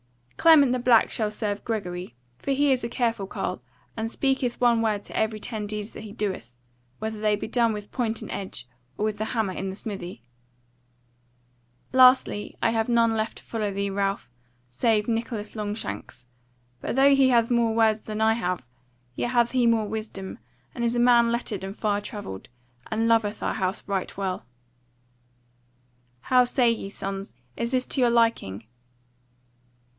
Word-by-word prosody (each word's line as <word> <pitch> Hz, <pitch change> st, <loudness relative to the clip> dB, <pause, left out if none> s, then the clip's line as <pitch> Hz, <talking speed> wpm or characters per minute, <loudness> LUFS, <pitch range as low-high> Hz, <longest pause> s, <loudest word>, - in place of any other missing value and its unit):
"Clement 305 Hz, -6 st, +6 dB
the 255 Hz, -, +1 dB
Black 240 Hz, -2 st, +4 dB
shall 215 Hz, -2 st, 0 dB
serve 210 Hz, -1 st, -3 dB
Gregory: 180 Hz, -, -4 dB, 0.2 s
for -, -, -6 dB
he 280 Hz, +1 st, +3 dB
is 255 Hz, -2 st, +1 dB
a 235 Hz, -, -2 dB
careful 230 Hz, -5 st, -1 dB
carle, 125 Hz, -, -4 dB, 0.3 s
and 225 Hz, 0 st, -2 dB
speaketh 265 Hz, -1 st, 0 dB
one 235 Hz, -2 st, +4 dB
word 210 Hz, -2 st, 0 dB
to -, -, -11 dB
every 220 Hz, 0 st, 0 dB
ten 210 Hz, -1 st, -4 dB
deeds 210 Hz, 0 st, -5 dB
that -, -, -8 dB
he 215 Hz, -1 st, -9 dB
doeth; 195 Hz, -, -4 dB, 0.4 s
whether 220 Hz, 0 st, -4 dB
they 210 Hz, -1 st, +3 dB
be 205 Hz, -, -5 dB
done 230 Hz, 0 st, +2 dB
with 210 Hz, -1 st, -7 dB
point 230 Hz, -3 st, -2 dB
and -, -, -7 dB
edge, 160 Hz, -11 st, -5 dB, 0.3 s
or 210 Hz, -, 0 dB
with 215 Hz, -1 st, -2 dB
the 215 Hz, -, -1 dB
hammer 220 Hz, -4 st, -1 dB
in 195 Hz, +1 st, -4 dB
the 190 Hz, -, -5 dB
smithy. 185 Hz, -, -6 dB, 1.7 s
"Lastly, 255 Hz, -4 st, +5 dB
I 230 Hz, -, +4 dB
have 225 Hz, +1 st, 0 dB
none 230 Hz, -1 st, +4 dB
left 220 Hz, 0 st, -2 dB
to -, -, -11 dB
follow 215 Hz, -3 st, -2 dB
thee, 200 Hz, 0 st, -2 dB
Ralph, 195 Hz, -9 st, -2 dB, 0.4 s
save 210 Hz, -, +1 dB
Nicholas 225 Hz, -2 st, -3 dB
Longshanks; 210 Hz, -, -5 dB, 0.5 s
but -, -, -3 dB
though 275 Hz, +1 st, +6 dB
he 270 Hz, -1 st, +5 dB
hath 235 Hz, -1 st, +3 dB
more 230 Hz, -2 st, +2 dB
words 220 Hz, -1 st, +3 dB
than 215 Hz, 0 st, -5 dB
I 220 Hz, 0 st, +4 dB
have, 180 Hz, -, -2 dB, 0.5 s
yet 240 Hz, -, -2 dB
hath 240 Hz, -1 st, +3 dB
he 250 Hz, -2 st, +3 dB
more 225 Hz, -2 st, +2 dB
wisdom, 215 Hz, -1 st, -6 dB, 0.3 s
and 240 Hz, -, -4 dB
is 235 Hz, 0 st, +1 dB
a -, -, +1 dB
man 240 Hz, -1 st, +5 dB
lettered 230 Hz, -5 st, -2 dB
and 195 Hz, +1 st, -5 dB
far 205 Hz, -2 st, 0 dB
travelled, 205 Hz, -, -7 dB, 0.4 s
and 225 Hz, +1 st, 0 dB
loveth 220 Hz, -2 st, +2 dB
our -, -, 0 dB
house 190 Hz, -1 st, -2 dB
right 195 Hz, -2 st, -2 dB
well. 190 Hz, -9 st, -3 dB, 1.7 s
"How 250 Hz, -, +4 dB
say 245 Hz, -1 st, +3 dB
ye, 220 Hz, -3 st, -4 dB
sons, 195 Hz, -2 st, -6 dB, 0.2 s
is 235 Hz, -, -2 dB
this 255 Hz, 0 st, 0 dB
to 270 Hz, -, +1 dB
your 245 Hz, -, +5 dB
liking?" 225 Hz, -, +1 dB
220 Hz, 175 wpm, -26 LUFS, 205-235 Hz, 1.7 s, Clement